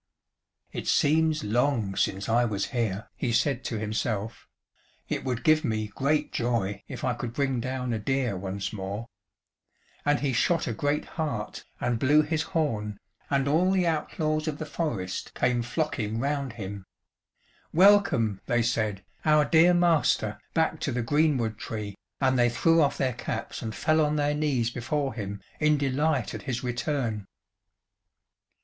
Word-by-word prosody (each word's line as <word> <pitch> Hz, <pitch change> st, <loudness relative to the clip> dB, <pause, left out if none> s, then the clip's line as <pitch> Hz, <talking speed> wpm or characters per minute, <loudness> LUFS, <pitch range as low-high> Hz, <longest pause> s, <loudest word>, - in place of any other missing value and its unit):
"It -, -, -5 dB
seems 155 Hz, +1 st, +3 dB
long 115 Hz, -3 st, +1 dB
since 95 Hz, +1 st, 0 dB
I 120 Hz, +2 st, +3 dB
was 105 Hz, -4 st, -1 dB
here," 110 Hz, -4 st, -1 dB
he 125 Hz, -, -1 dB
said 130 Hz, +2 st, +1 dB
to 115 Hz, -, -2 dB
himself; 110 Hz, 0 st, -3 dB, 0.6 s
"It -, -, -2 dB
would 125 Hz, -2 st, -2 dB
give 155 Hz, 0 st, +4 dB
me 110 Hz, -1 st, -1 dB
great 145 Hz, +3 st, 0 dB
joy 115 Hz, -5 st, -1 dB
if -, -, -7 dB
I 125 Hz, -, +1 dB
could 120 Hz, -1 st, -5 dB
bring 135 Hz, -2 st, 0 dB
down 125 Hz, 0 st, -2 dB
a 110 Hz, -, -1 dB
deer 130 Hz, -1 st, 0 dB
once 95 Hz, +2 st, -4 dB
more," 100 Hz, +2 st, -4 dB, 1.0 s
and 145 Hz, 0 st, +2 dB
he 140 Hz, -2 st, 0 dB
shot 165 Hz, +8 st, +2 dB
a 120 Hz, -, -2 dB
great 145 Hz, +6 st, 0 dB
hart, 150 Hz, -10 st, -4 dB
and 120 Hz, -2 st, 0 dB
blew 150 Hz, +4 st, +5 dB
his 155 Hz, +1 st, -1 dB, 0.2 s
horn, 105 Hz, -9 st, -1 dB, 0.3 s
and 140 Hz, -1 st, +1 dB
all 165 Hz, +6 st, +3 dB
the 190 Hz, -2 st, +2 dB
outlaws 155 Hz, -1 st, -1 dB
of 150 Hz, -2 st, -2 dB
the 155 Hz, -, -5 dB
forest 120 Hz, -, -3 dB
came 125 Hz, -1 st, +1 dB
flocking 120 Hz, -4 st, -2 dB
round 140 Hz, -1 st, -1 dB
him. 100 Hz, -3 st, -7 dB, 0.8 s
"Welcome," 170 Hz, -, +4 dB
they 120 Hz, -1 st, +2 dB
said, 110 Hz, -4 st, -1 dB, 0.2 s
"our 150 Hz, -1 st, +4 dB
dear 170 Hz, +3 st, +5 dB
master, 165 Hz, -11 st, +2 dB
back 160 Hz, -1 st, +1 dB
to 140 Hz, -, -1 dB
the 120 Hz, -1 st, -1 dB
greenwood 130 Hz, -5 st, +1 dB
tree," 105 Hz, -2 st, -5 dB, 0.3 s
and 130 Hz, -2 st, +2 dB
they 120 Hz, 0 st, +5 dB
threw 165 Hz, +7 st, +3 dB
off 145 Hz, -, +2 dB
their 130 Hz, -2 st, 0 dB
caps 120 Hz, -1 st, -5 dB
and 110 Hz, -3 st, -4 dB
fell 155 Hz, 0 st, +2 dB
on 150 Hz, 0 st, +1 dB
their 145 Hz, 0 st, +1 dB
knees 140 Hz, -6 st, 0 dB
before 135 Hz, +3 st, -2 dB
him 100 Hz, -3 st, -6 dB, 0.2 s
in 150 Hz, -1 st, +4 dB
delight 140 Hz, -1 st, 0 dB
at -, -, -5 dB
his 125 Hz, -4 st, -3 dB
return. 120 Hz, -4 st, -2 dB
125 Hz, 160 wpm, -27 LUFS, 110-150 Hz, 1.0 s, blew